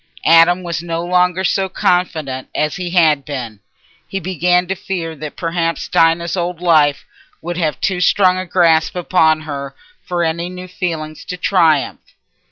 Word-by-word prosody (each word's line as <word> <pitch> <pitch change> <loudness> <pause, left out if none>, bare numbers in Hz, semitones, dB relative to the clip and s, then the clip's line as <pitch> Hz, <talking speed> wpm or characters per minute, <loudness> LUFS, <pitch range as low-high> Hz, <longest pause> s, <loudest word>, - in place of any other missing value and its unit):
Adam 165 +3 +5
was 170 -2 -3
no 170 0 -4
longer 180 +1 +1
so 190 +1 0
confident 160 -8 -1
as 150 0 -1
he 180 -1 -4
had 160 -5 +3
been. 125 -8 -6 0.5
He 195 - -4
began 180 0 +1
to 190 - -2
fear 175 -3 -5
that 150 +1 -7
perhaps 165 -1 -2
Dinah's 165 +1 +2
old 175 -1 -3
life 155 -5 +2 0.3
would 175 +1 -5
have 155 -7 -1
too 180 -2 -1
strong 185 0 +4
a 185 - -5
grasp 170 0 +2
upon 160 -3 +2
her 140 -3 -6 0.3
for 175 -1 -2
any 170 +2 -2
new 180 0 -8
feeling 165 -4 -4
to 180 - -5
triumph. 165 -6 +2
170 Hz, 160 wpm, -17 LUFS, 155-180 Hz, 0.5 s, Adam